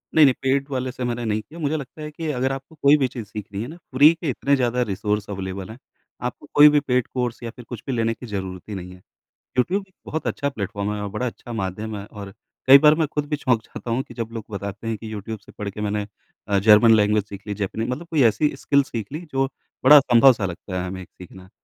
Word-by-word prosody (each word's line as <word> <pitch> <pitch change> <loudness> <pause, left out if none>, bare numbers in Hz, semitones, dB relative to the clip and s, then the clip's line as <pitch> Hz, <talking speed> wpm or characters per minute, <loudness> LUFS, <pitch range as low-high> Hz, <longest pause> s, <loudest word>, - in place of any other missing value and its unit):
नहीं-नहीं 145 -5 +7
पेड 135 +1 +1
वाले 130 -1 -2
से 125 0 -6
मैंने 120 0 -2
नहीं 110 -1 0
किया, 160 +10 -13
मुझे 155 +1 0
लगता 145 +2 -9
है 150 0 -6
कि 160 +1 -6
अगर 130 +1 +1
आपको 135 +4 -7
कोई 140 +2 +6
भी 135 -3 +2
चीज़ 120 -3 -7
सीखनी 105 -1 -6
है 120 - -4
ना 165 +3 -10 0.2
फ्री 150 +5 +8
के 165 -2 -4
इतने 140 +2 +1
ज़्यादा 125 -1 +1
रिसोर्स 105 +1 -2
अवेलेबल 95 0 -5
हैं 110 - -9 0.5
आपको 125 - -8
कोई 150 +1 +9
भी 150 - +4
पेड 125 -4 0
कोर्स 125 -2 -2
या 115 - -4
फिर 125 - -11
कुछ 120 -4 -7
भी 135 - -1
लेने 115 -1 +1
की 125 - -11
ज़रूरत 95 -4 -5
ही 105 - -4
नहीं 90 -1 -7
है। 90 - -16 0.6
यूट्यूब 190 +10 +1 0.2
बहुत 160 - -4
अच्छा 140 - -1
प्लेटफॉर्म 100 -4 -3
है 105 - -4
और 100 - -3
बड़ा 110 +5 -2
अच्छा 120 0 -7
माध्यम 105 +1 -4
है 100 - -6
और 100 -3 -9 0.3
कई 135 +1 +10
बार 150 +1 +6
मैं 160 -1 +1
ख़ुद 150 -1 -1
भी 150 - 0
चौंक 125 -6 +1
जाता 120 - -8
हूँ 125 +3 +1
कि - - -14
जब 115 -2 -4
लोग 115 -2 -6
बताते 100 +2 -6
हैं 115 -1 -1
कि 110 +1 -8
यूट्यूब 110 +1 -5
से 105 - -18
पढ़ 105 -1 -5
के 105 - -8
मैंने 105 0 -1 0.4
अ, 100 -1 +2
जर्मन 110 +2 +7
लैंग्वेज 105 -1 +3
सीख 100 0 -10
ली 105 - -3
जैपनीज़ 105 +3 -3
मतलब 160 +7 -4
कोई 155 -4 +3
ऐसी 150 +7 +1
स्किल 140 0 +2
सीख 115 -7 -5
ली 155 - -4
जो 135 0 +2 0.4
बड़ा 150 +3 +10
असंभव 130 -1 +7
सा 105 -4 -4
लगता 90 +1 -5
है 90 - -3
हमें 95 +1 -6
एक - - -13
सीखना। 95 +1 -12
115 Hz, 255 wpm, -23 LUFS, 105-135 Hz, 0.6 s, कई